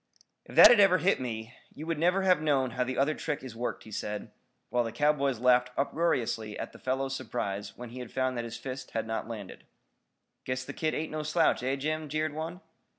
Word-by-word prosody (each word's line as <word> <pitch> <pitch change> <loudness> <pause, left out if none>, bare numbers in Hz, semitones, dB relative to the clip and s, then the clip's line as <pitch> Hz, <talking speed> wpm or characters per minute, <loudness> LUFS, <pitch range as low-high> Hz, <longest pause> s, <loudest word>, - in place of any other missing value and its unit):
"If - - -12
that - - +11
had 240 - +6
ever 195 -2 +6
hit 180 -2 +2
me, 115 -1 -5 0.2
you 155 - -7
never 175 +5 +2
would - - -2
have 180 -4 +4
known 135 -4 +2
how 130 0 0
the 125 0 -4
other 140 +3 +3
trick 150 -3 -3
is 125 -4 -8
worked," 120 +2 -3
he 110 - -13
said, 105 0 -4 0.4
while 120 0 +2
the 115 - -4
cowboys 140 -2 +2
laughed 125 0 +4
uproariously 125 -8 0
at - - -5
the - - -14
fellow's 135 +1 -1
surprise 100 -6 -4
when 120 -1 -7
he 125 +1 -6
found 130 +1 -1
that 120 - -2
his 115 - -6
fist 130 0 -6
had 115 - -1
not 110 0 -3
landed. 105 -5 -8 0.8
"Guess 130 0 -3
the - - -6
kid 155 -1 -1
ain't 155 - -3
no 155 0 -2
slouch, 155 -1 +2
eh, 130 +2 0
Jim?" 155 +2 -2
jeered 155 +1 -1
one. 165 +4 -5
130 Hz, 215 wpm, -29 LUFS, 120-155 Hz, 0.8 s, that